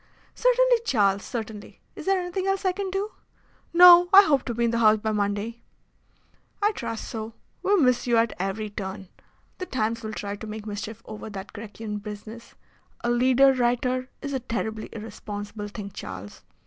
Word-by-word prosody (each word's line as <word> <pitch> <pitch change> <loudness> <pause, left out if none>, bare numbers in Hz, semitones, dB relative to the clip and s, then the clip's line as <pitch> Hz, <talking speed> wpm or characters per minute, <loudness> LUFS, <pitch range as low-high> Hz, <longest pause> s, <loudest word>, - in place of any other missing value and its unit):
"Certainly, - - +4
Charles, 200 - +2
certainly. 220 -4 -7 0.2
Is - - -9
there 390 -1 +3
anything 365 +1 -3
else 390 0 0
that 375 - +3
I - - +2
can 390 +1 -4
do?" 390 +3 -2 0.6
"No. 355 0 +9
I 395 +1 +10
hope 285 -7 +3
to 240 - -2
be 235 +1 +1
in 230 - +1
the 230 - 0
House 215 -1 +6
by 220 +1 -2
Monday." 210 +3 -2 1.0
"I 415 +1 +3
trust 230 - -5
so. 220 0 -6 0.3
We 405 - +3
miss 250 -4 +2
you 235 -1 +3
at 230 -2 +2
every 200 +3 -3
turn. 190 -2 -6 0.5
The 370 - -4
Times 230 -2 -1
will 220 -2 -5
try 205 -1 -5
to 220 - -8
make 215 0 -7
mischief 210 +1 -6
over 215 0 -8
that 195 -1 -8
Grecian 210 0 -6
business. 215 +2 -9 0.5
A 240 - +1
leader 260 +2 +5
writer 255 +1 0
is 280 -1 -4
a 265 - 0
terribly 220 -3 -4
irresponsible 210 -1 -7
thing, 205 -1 -7
Charles. 100 - -8
230 Hz, 180 wpm, -25 LUFS, 210-270 Hz, 1.0 s, I